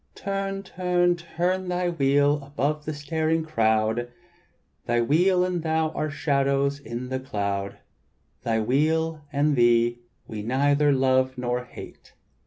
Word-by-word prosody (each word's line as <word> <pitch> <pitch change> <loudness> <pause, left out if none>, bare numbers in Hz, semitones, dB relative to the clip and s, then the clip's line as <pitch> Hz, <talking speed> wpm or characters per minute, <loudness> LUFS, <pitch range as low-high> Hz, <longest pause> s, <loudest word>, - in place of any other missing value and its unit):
"Turn, 195 0 -3
turn 180 -2 +1 0.5
thy 180 0 0
wheel 145 -2 +2
above 145 +2 -2
the 155 - -3
staring 160 +2 -1
crowd; 110 -3 +1 0.8
Thy 120 0 +2
wheel 180 +9 +3
and 180 -2 -2
thou 160 0 0
are 155 -1 -3
shadows 140 -1 0
in 125 -1 -6
the 130 0 -2
cloud; 100 -5 -3 0.6
Thy 115 -2 0
wheel 155 +6 +1
and 145 0 +2
thee 120 -1 +3 0.3
we 110 -1 -6
neither 140 +5 +2
love 130 -1 +2
nor 125 0 -2
hate." - - -12
140 Hz, 125 wpm, -25 LUFS, 125-160 Hz, 0.8 s, wheel